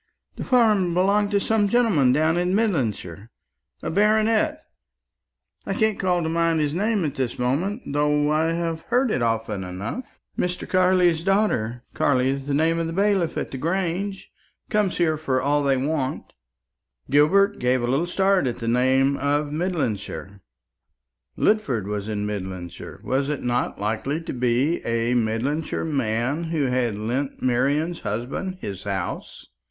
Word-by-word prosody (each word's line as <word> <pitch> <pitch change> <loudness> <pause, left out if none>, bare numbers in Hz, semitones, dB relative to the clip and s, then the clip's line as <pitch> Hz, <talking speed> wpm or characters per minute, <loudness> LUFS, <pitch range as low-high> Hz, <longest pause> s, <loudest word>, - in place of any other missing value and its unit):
The - - -5
farm 210 -9 +3
belongs 200 +3 +2
to 200 -1 +2
some 210 0 +1
gentleman 200 - +3
down 155 +4 +2
in 180 +2 +1
Midlandshire, 115 - -1 0.5
a - - -2
baronet; 215 - +2 1.1
I - - -1
can't 220 -4 +1
call 180 -2 +1
to - - -1
mind 165 0 +1
his 150 -1 0
name 205 +1 0
at 145 - -2
this 130 -3 -3
moment, 165 - -1
though 150 +1 +1
I 155 +1 +2
have 165 -1 -2
heard 245 0 +2
it 130 - 0
often 115 -4 -1
enough. 95 - -6 0.2
Mr. 180 0 -2
Carley's 180 -3 +3
daughter 145 - 0
Carley 130 -2 +2
is 135 0 -4
the 140 - 0
name 165 +3 +2
of 165 - -1
the 165 - -4
bailiff 195 -3 +1
at - - -3
the 130 - -5
Grange 190 +4 -2 0.4
comes 210 -3 +1
here 160 -3 +2
for 135 -4 0
all 145 +2 +1
they 140 -2 +2
want." 135 0 -2 0.8
Gilbert 195 +8 +4
gave 125 0 +1
a - - 0
little 140 +8 +1
start 190 -3 +2
at 120 - -2
the 115 - -5
name 130 +3 +3
of 145 +1 0
Midlandshire. 115 - -3 1.0
Lidford 140 - +1
was 105 +1 -4
in 105 -1 -2
Midlandshire. 95 -4 -6
Was 135 +2 0
it 150 - -3
not 120 -3 -1
likely 115 +9 -1
to 165 - -6
be 125 +6 +1
a 115 +1 0
Midlandshire 125 +9 -1
man 135 +1 -1
who 160 -2 -1
had 125 -4 0
lent 125 +6 -3
Marian's 140 +7 +1
husband 130 - -4
his 95 -2 -5
house? 95 -3 -4
150 Hz, 155 wpm, -23 LUFS, 125-185 Hz, 1.1 s, Gilbert